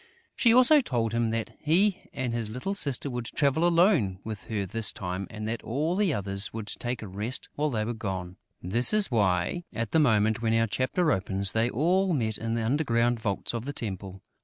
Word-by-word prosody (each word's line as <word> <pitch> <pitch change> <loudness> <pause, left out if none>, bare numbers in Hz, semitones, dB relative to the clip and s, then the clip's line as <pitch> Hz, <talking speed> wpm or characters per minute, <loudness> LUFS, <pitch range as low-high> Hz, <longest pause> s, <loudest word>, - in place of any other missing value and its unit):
She 235 - +3
also 255 +5 +6
told 115 - -2
him 115 -1 0
that 115 0 -3
he 185 +6 +1
and 125 -2 -3
his 115 -2 -2
little 125 - -4
sister 140 -8 +2
would 120 -3 -5
travel 150 +7 +1
alone 170 - +2
with 110 -3 -7
her 105 -3 -3
this 115 +3 +3
time 90 0 -5
and 110 0 -7
that 115 +1 -4
all 150 +9 -2
the 200 -3 +1
others 100 -4 +3
would 110 -1 -6
take 120 +2 -4
a - - -7
rest 105 +6 -4
while 150 +1 -1
they 110 -5 -2
were 120 - -3
gone. 95 -5 -6 0.3
That 120 - +4
is 210 -8 +5
why, 95 - 0
at 115 -1 -3
the 160 - +3
moment 110 -5 +2
when 115 -1 +1
our 115 0 +2
chapter 130 - 0
opens, 95 -1 0
they 110 +1 +1
had 120 - -3
all 180 +7 +1
met 110 -5 -2
in 115 +1 -3
the 115 -1 -2
underground 120 -3 +1
vaults 100 -1 -2
of 115 0 -4
the 145 - -5
temple. 95 -7 -6
115 Hz, 210 wpm, -27 LUFS, 105-145 Hz, 0.3 s, also